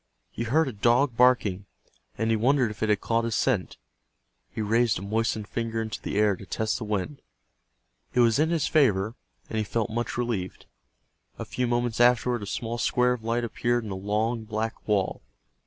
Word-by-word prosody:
He 115 - -4
heard 150 +7 +2
a 130 - -4
dog 120 +5 +2
barking, 110 -6 +3 0.5
and 115 0 0
he - - +3
wondered 125 +1 +2
if 105 - -11
it 110 - +1
had 105 - +2
caught 115 0 +1
his 115 -2 -1
scent. 115 -9 0 0.7
He - - -8
raised 110 +1 +2
a 90 - -6
moistened 110 0 -1
finger 115 0 -3
into 110 +1 -4
the - - -3
air 105 -2 +3
to 95 - -11
test 110 +6 -1
the - - -5
wind. 105 +7 -3 0.9
It 125 - +5
was 115 +1 +4
in 155 +1 +3
his 165 -4 +1
favor, 110 -9 +2 0.3
and 110 - -3
he - - +1
felt 110 +1 -2
much 120 +1 -3
relieved. 115 -7 -3 0.7
A - - -5
few 125 -1 -2
moments 120 -1 0
afterward 120 -1 +3
a 100 - -6
small 115 +3 -3
square 125 +2 +2
of 120 -3 -7
light 115 +1 0
appeared 120 +1 0
in 105 - -6
the - - -3
long 110 +4 -1
black 110 +1 -4
wall. 100 -3 0
115 Hz, 195 wpm, -26 LUFS, 105-120 Hz, 0.9 s, It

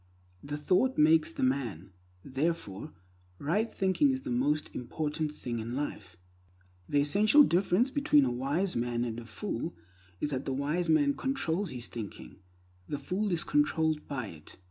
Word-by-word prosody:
The 145 +1 -4
thought 185 - +2
makes 155 +1 +5
the - - -3
man; 120 - -1 0.3
therefore 135 - -2 0.5
right 205 - 0
thinking 190 +10 +2
is 265 0 -1
the - - -4
most 145 +5 0
important 150 +4 -3
thing 120 -4 -4
in 115 +2 -4
life. 105 -10 -5 0.7
The 145 - +3
essential 210 - +6
difference 195 +5 +2
between 150 - +4
a 125 - 0
wise 145 +10 -1
man 120 0 0
and 115 -1 -4
a 120 - -9
fool 105 -5 -4 0.4
is 150 - -2
that 130 -1 -2
the 135 - -1
wise 150 +6 -1
man 145 -3 +4
controls 205 - -1
his 125 -4 -5
thinking, 110 -5 -8 0.5
the 145 - -2
fool 185 +9 -2
is 170 -2 0
controlled 160 - +1
by 130 -4 -3
it. 80 -2 -13
150 Hz, 160 wpm, -30 LUFS, 125-180 Hz, 0.7 s, essential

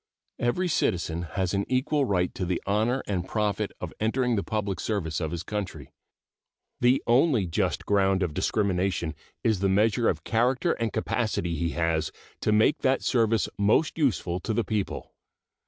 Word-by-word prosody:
Every 150 +10 +1
citizen 85 - 0 0.2
has 95 -1 0
an 100 0 +1
equal 135 +3 +1
right 90 -6 0
to - - -4
the 90 -1 -1
honor 110 +6 +1
and 95 -3 -2
profit 105 -2 -1
of - - -6
entering 120 +2 +1
the 100 - +1
public 105 -3 -2
service 90 -8 -2
of 80 - -1
his 85 +1 -4
country. 100 -10 -5 0.9
The 125 +2 +3
only 120 - +3
just 85 - -1
ground 95 -1 +2
of 85 -4 -2
discrimination 90 -3 0 0.3
is 110 -4 +2
the 95 0 +1
measure 110 +4 +3
of 80 -2 -2
character 125 +8 +1
and 115 -2 -1
capacity 105 -9 -1
he 85 0 -1
has 80 -1 0 0.3
to - - 0
make 110 +7 +4
that 130 0 +1
service 115 -3 +2
most 110 +10 +3
useful 105 - 0
to 110 +4 -3
the 120 - +2
people. 105 -3 -3
105 Hz, 165 wpm, -27 LUFS, 90-120 Hz, 0.9 s, make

